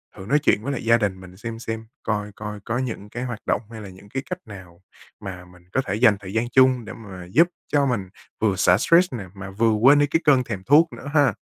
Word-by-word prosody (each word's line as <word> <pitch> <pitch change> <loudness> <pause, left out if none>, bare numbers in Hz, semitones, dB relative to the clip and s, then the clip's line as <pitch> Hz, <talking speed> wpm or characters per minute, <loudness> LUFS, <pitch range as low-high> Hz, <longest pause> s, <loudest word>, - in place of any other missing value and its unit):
thử 95 - -9
nói 145 +8 +3
chuyện 110 -7 +2
với 140 - -2
lại 125 - -5
gia 115 +1 +5
đình 100 -4 -2
mình 95 0 -13
xem 115 +1 -6
xem, 110 -1 -5 0.2
coi 105 -1 -2
coi 105 -1 -6
có 115 +4 -3
những 115 -5 -4
cái 120 +4 -5
hoạt 120 -3 -5
động - - +1
hay 110 -1 -8
là 100 - -9
những 95 +2 -15
cái 135 +5 -4
cách 180 - -3
nào 95 -4 -12 0.4
mà 90 -2 -7
mình 90 -1 -19
có 135 - +1
thể 100 - -2
dành 110 -2 +4
thời 95 -1 -9
gian 115 +2 0
chung 130 -2 +4
để 110 - -8
mà 95 -5 -10
giúp 170 - +5 0.2
cho 145 -1 +2
mình 110 -8 -2 0.3
vừa 105 -3 +2
xả 90 0 +4
stress 170 - +3
nè 110 -6 -5
mà 100 0 -8
vừa 110 +3 +2
quên 130 +7 +5
đi 145 - +3
cái 165 +3 +1
cơn 135 -4 +5
thèm 100 -6 -6
thuốc 155 - +4
nữa 140 - -9
ha. 145 -7 +4
110 Hz, 260 wpm, -23 LUFS, 100-130 Hz, 0.4 s, gia